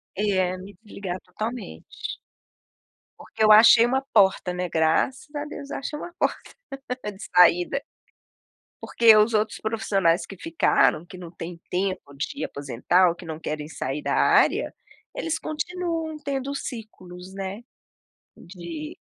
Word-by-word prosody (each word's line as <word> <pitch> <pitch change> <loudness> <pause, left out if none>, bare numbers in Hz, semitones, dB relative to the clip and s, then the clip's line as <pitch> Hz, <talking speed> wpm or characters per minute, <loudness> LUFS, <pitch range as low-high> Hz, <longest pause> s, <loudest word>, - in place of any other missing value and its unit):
É, 190 -3 +1
me 190 +2 -11
desligar 195 -4 -6
totalmente. 215 - -6 1.3
Porque - - -4
eu 215 - +7
achei 225 +2 +8
uma 260 +2 +1
porta, 190 -4 +3
né, 180 0 -3
graças 165 - +1
a 290 0 -3
Deus, 280 -1 -8
eu - - -4
achei 280 +2 -5
uma 345 - -8
porta - - -2 0.6
de 200 0 -11
saída. 180 +9 +5 1.0
Porque 230 -2 +5
os 215 +2 +4
outros 215 0 0
profissionais 195 -6 +1
que 195 - -10
ficaram, 155 -2 +2
que 185 - -11
não 175 -2 -9
têm 170 0 -8
tempo 185 -6 -2
de 140 - -4
aposentar 145 +7 +1
ou 170 - 0
que 175 0 -12
não 160 -1 -5
querem 150 -2 -5
sair 145 -2 -4
da - - -1
área, - - +3 0.4
eles 325 -1 -2
continuam 325 0 -3
tendo 275 0 -3
ciclos, 190 -8 -8
né, 195 +3 -5 0.7
de 170 -4 -8
190 Hz, 140 wpm, -24 LUFS, 170-235 Hz, 1.3 s, achei